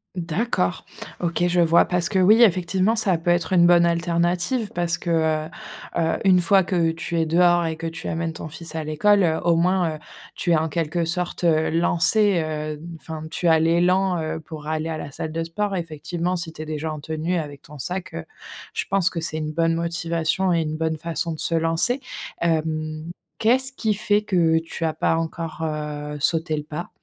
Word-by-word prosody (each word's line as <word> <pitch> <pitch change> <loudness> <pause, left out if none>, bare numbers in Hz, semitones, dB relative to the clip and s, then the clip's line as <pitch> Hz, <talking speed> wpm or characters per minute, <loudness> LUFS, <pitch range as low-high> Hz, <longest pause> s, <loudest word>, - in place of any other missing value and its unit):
D'accord. 170 - -1 0.4
OK, 175 0 0
je 175 0 +1
vois 170 0 +5
parce 180 -1 0
que, 190 - 0
oui, 215 +6 +6
effectivement, 190 +2 +2
ça 200 -6 +2
peut 170 +2 0
être 175 0 0
une 175 -2 +5
bonne 175 0 +6
alternative 175 +6 0
parce 175 -1 0
que, 175 - -5
heu 160 -1 +1 0.5
heu, 165 -1 +1
une 185 -2 +5
fois 190 +2 +4
que 175 -2 +1
tu 165 +1 -3
es 165 - +2
dehors 175 +1 +4
et 160 -1 -3
que 165 0 -4
tu 165 0 -6
amènes 165 0 -2
ton 160 - -7
fils 160 +1 -9
à 160 - -2
l'école, 195 +7 +3
heu, 160 -2 +2
au 170 -1 +3
moins, 175 -1 +1
heu, 155 - -10 0.4
tu 175 - -1
es - - +5
en 160 +1 0
quelque 165 +2 -1
sorte, 180 +1 -3
heu, 160 -2 +3
lancée, 175 +2 +3
heu, 155 -1 -4 0.2
enfin 155 +1 -7
tu 175 - -1
as 160 -1 +6
l'élan, 175 +2 +2
heu, 155 0 -3
pour 155 -1 -9
aller 155 +1 -2
à 160 -1 -3
la - - -6
salle 155 +3 -5
de 165 +1 -2
sport 195 +4 -2
effectivement 170 +1 -3
si 170 -2 -4
tu - - -8
es - - -5
déjà 155 0 -3
en 150 - -6
tenue, 160 +4 -2
avec 145 -3 -6
ton 150 -1 -12
sac, 180 +7 -4
heu, 80 - -5 0.5
je - - -1
pense 195 -2 +2
que 170 - -4
c'est 160 -1 -3
une 155 -1 -3
bonne 165 +1 +1
motivation 170 +2 0
et 165 - +2
une 155 0 -3
bonne 160 0 -1
façon 170 +1 -2
de 155 - -6
se 165 - 0
lancer, 165 +11 +1 0.4
hem, 155 -1 -1 0.3
qu'est-ce 260 +4 +2
qui 220 -5 0
fait 210 0 +1
que 170 -6 +2
tu 165 0 -4
as 160 - 0
pas 160 - +1
encore, 165 0 -4
heu, 150 -1 -4
sauté 160 +2 +1
le 150 - -4
pas? 155 +3 -6
165 Hz, 210 wpm, -23 LUFS, 160-180 Hz, 0.5 s, oui